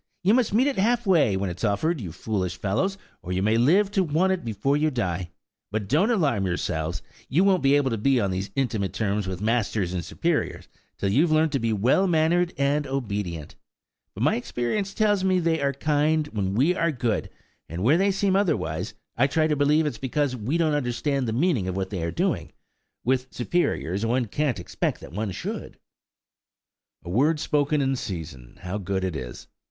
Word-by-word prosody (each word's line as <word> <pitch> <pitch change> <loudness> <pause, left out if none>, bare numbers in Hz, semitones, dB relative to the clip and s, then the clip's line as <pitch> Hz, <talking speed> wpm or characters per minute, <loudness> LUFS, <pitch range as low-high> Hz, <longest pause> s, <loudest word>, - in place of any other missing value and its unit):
You 195 +4 +4
must 245 -2 +2
meet 230 +6 +3
it 280 -7 0
half 240 +4 +2
way, 155 - +3
when 95 -1 -2
it's 90 - -8
offered, 120 +9 0
you 90 -6 -5
foolish 95 +1 -3
fellows, 125 - -1 0.2
or 90 - -7
you 95 +1 0
may 110 +2 +3
live 190 - +4
to 195 -2 +2
want 175 +4 +2
it 185 - -4
before 115 +5 0
you 155 +1 +2
die! 90 - -2 0.4
But, 105 -1 -2
don't 160 - +3
alarm 140 - +1
yourselves! 85 -2 -2 0.3
You 165 +8 +3
won't 195 -2 +3
be 135 +1 +4
able 140 -3 +2
to 115 - -2
be 135 +3 +3
on 100 -4 0
these 95 +2 -3
intimate 115 -8 -1
terms 105 -2 -1
with 95 +1 -4
masters 110 -5 0
and 90 -2 -2
superiors, - - -2 0.3
till 100 - -1
you've 155 - +3
learnt 155 0 +3
to 140 - 0
be 115 -1 0
well 125 - +3
mannered 170 +1 +2
and 140 +1 +1
obedient. 100 - -3 0.6
But - - -3
my - - +3
experience 125 - -2
tells 205 -3 +2
me 185 -1 +3
they 165 -2 +1
are 140 0 +2
kind 150 +2 +1
when 100 -4 -2
we 145 +10 +3
are 170 -2 +1
good; 120 -5 -1 0.4
and 85 +3 -4
where 140 +9 +5
they 200 +1 +3
seem 195 0 +1
otherwise, 105 - 0 0.2
I 135 +4 +3
try 155 +2 +1
to 155 -1 +1
believe 150 +2 +3
it - - +2
is 120 - -9
because 135 0 -1
we 125 +8 -1
don't 160 -3 +2
understand 135 0 -1
the - - -1
meaning 130 - +1
of 95 - -2
what 95 +1 -3
they 95 -4 -3
are 85 - -1
doing;–with 125 +8 -3
superiors 120 - -1
one 120 +2 +1
can't 130 +1 -1
expect 85 - -2
that - - -11
one 105 +2 -2
should." 90 - -6 1.3
A - - -7
word 150 - +2
spoken 150 -1 +1
in 135 0 +1
season, 80 - -7
how 95 +3 -3
good 95 0 -2
it 95 -3 -2
is! 60 -5 -7
130 Hz, 200 wpm, -25 LUFS, 100-160 Hz, 1.3 s, where